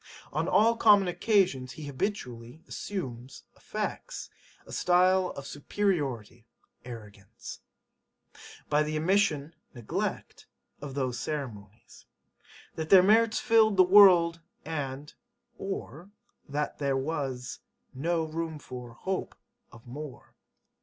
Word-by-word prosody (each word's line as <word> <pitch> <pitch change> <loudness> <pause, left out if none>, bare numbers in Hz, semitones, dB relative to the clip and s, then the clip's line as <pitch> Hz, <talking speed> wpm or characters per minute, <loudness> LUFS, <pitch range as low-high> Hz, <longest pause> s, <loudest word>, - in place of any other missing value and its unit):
On 155 +4 0
all 220 +5 +4
common 205 -4 +6
occasions 180 - +1
he 155 - -8
habitually 130 - -4
[assumes] 130 - -6
affects - - -5 0.3
a - - -13
style 185 +1 +3
of 140 - -7
[superiority] 140 - -2 0.4
arrogance. 105 -5 -10 1.1
By 150 0 +3
the 155 0 -1
[omission] 165 -3 +1 0.2
neglect 120 -3 -4 0.3
of 140 -2 -7
those 130 -3 -2
ceremonies. 110 -8 -7 0.7
That 160 -1 -5
their 190 -2 +8
merits 220 +3 +4
filled 220 -4 +4
the 185 - +8
world 180 -3 +7 0.2
[and] 145 -2 -5 0.5
or 195 -3 -6 0.4
that 145 +1 -3
there 140 -2 +1
was 135 -3 -3 0.3
no 165 +5 0
[room 160 0 -4
for] 125 -4 -9
hope 190 +10 -4 0.4
of 115 -1 -15
more.' 140 +3 -9
150 Hz, 105 wpm, -29 LUFS, 130-185 Hz, 1.1 s, their